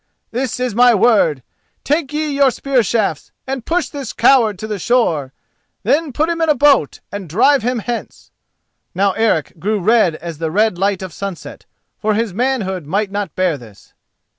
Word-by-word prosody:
This 250 +1 -3
is 250 -3 -1
my 245 +1 +5
word: 190 - +3 0.4
take 295 0 0
ye 305 0 -2
your 280 -1 +4
spear 265 0 0
shafts 210 -8 -1
and 265 -3 -5
push 335 -4 0
this 275 -5 -7
coward 230 -4 +4
to 215 - -6
the 210 -2 -4
shore. 165 - +1 0.5
Then 285 +7 +1
put 300 +6 0
him 335 0 -2
in 325 - +2
a 300 - +4
boat 275 - +3
and 200 -4 -6
drive 265 - +3
him 245 +2 -1
hence." 235 +1 -6 0.6
Now 195 +2 +2
Eric 185 -7 0
grew 210 +5 -1
red 195 -4 +3
as 165 -1 -8
the 165 -1 -2
red 205 +1 +1
light 195 -1 0
of 185 -4 -7
sunset, 195 -2 -7 0.3
for 215 -1 0
his 220 -3 -1
manhood 195 - -1
might 200 +4 -1
not 200 -5 -4
bear 180 -6 0
this. 110 -4 -17
220 Hz, 180 wpm, -17 LUFS, 185-260 Hz, 0.6 s, my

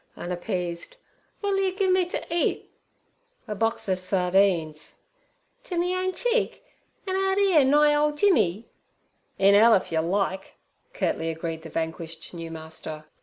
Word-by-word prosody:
unappeased. 175 - -4 0.5
'W'at'll 400 -1 +1
yer 380 0 -1
gimme 375 -2 +3
ter - - -4
eat?' 340 0 -1 0.8
'A 210 - -3
box 225 +2 -1
ov 185 -1 +1
sardines.' 180 -4 +1 0.7
'Ter 365 -8 -5
me 355 +2 +1
own 370 0 0
cheek? - - -1 0.4
an' 380 -1 -2
out 385 0 +1
'ere 380 -7 +5
nigh 295 +2 +4
ole 300 0 +2
Jimmy?' 275 - +2 0.7
'In 195 +1 +5
'ell 225 +3 +7
if 185 - -1
yer 160 -1 +1
like' 190 +2 -2 0.4
curtly 165 - -1
agreed 165 0 -4
the 160 - -10
vanquished 165 +1 -5
new 165 -1 -6
master. 160 -1 -7
200 Hz, 140 wpm, -25 LUFS, -, 0.8 s, ell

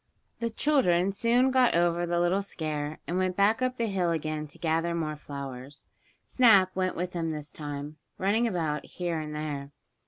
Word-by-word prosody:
The 230 - -1
children 200 - +2
soon 240 +5 +2
got 255 -5 +4
over 175 0 +2
the 170 0 +1
little 175 +3 +2
scare, 155 -5 -4
and 175 +2 -1
went 185 -1 0
back 210 +5 +3
up 255 0 0
the 235 - 0
hill 190 -5 0
again 155 -2 -2
to 145 - -17
gather 165 +1 0
more 155 -2 -2
flowers. 140 -1 -8 0.4
Snap 200 -7 +5
went 185 0 0
with 180 +1 -3
them 165 -2 -2
this 150 -2 -6
time, 145 0 -6 0.2
running 215 +5 +2
about 160 -7 -1
here 175 -2 -3
and 150 -1 -5
there. 145 -2 -4
175 Hz, 180 wpm, -28 LUFS, 155-200 Hz, 0.4 s, Snap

